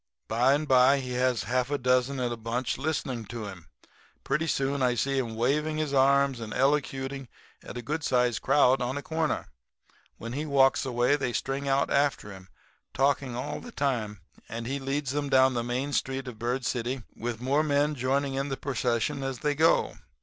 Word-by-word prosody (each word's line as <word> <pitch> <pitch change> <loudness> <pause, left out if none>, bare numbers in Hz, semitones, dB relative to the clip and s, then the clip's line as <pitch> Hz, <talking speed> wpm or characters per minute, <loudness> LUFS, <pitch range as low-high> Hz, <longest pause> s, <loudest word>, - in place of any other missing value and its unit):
By 125 +5 +3
and 150 +1 -2
by 130 +1 +5
he 125 -1 -5
has 125 -2 +1
half 125 +1 0
a 145 - 0
dozen 125 +1 +1
in 125 -1 -1
a - - -2
bunch 115 +3 -3
listening 135 -6 -2
to 115 -2 -6
him; 100 -2 -7 0.3
and - - -30
pretty 150 +4 0
soon 135 -1 0
I 125 -1 +2
see 135 +3 0
him 115 -3 -3
waving 150 +7 0
his 155 -2 -2
arms 140 -1 +3
and 110 -2 -6
elocuting 135 -1 0 0.4
at - - -8
a 120 - -5
good 150 +5 -3
sized 125 -3 +1
crowd 135 -1 +4
on 125 +3 -2
a 145 - -5
corner. 160 0 -2 0.7
When 115 +1 -7
he 145 +3 -2
walks 135 -3 +3
away 125 +3 +2
they 135 -4 -2
string 135 +5 -2
out 135 0 +1
after 140 -7 +1
him, 95 -1 -12 0.5
talking 135 -2 +1
all 145 +4 -4
the 245 - -10
time; 115 - -2 0.3
and 115 +1 -5
he 135 +3 -2
leads 135 0 -2
'em 145 -1 -1
down 130 -1 +5
the 120 -1 -1
main 130 +4 -2
street 135 -1 -1
of 115 -4 -8
Bird 125 +2 -2
City 125 +1 -2
with 120 -1 -4
more 135 +4 +2
men 145 0 +1
joining 135 +1 -1
the 135 - -3
procession 130 +1 -1
as 135 -2 -4
they 150 -1 +1
go. 160 +3 +2
135 Hz, 195 wpm, -28 LUFS, 125-140 Hz, 0.7 s, by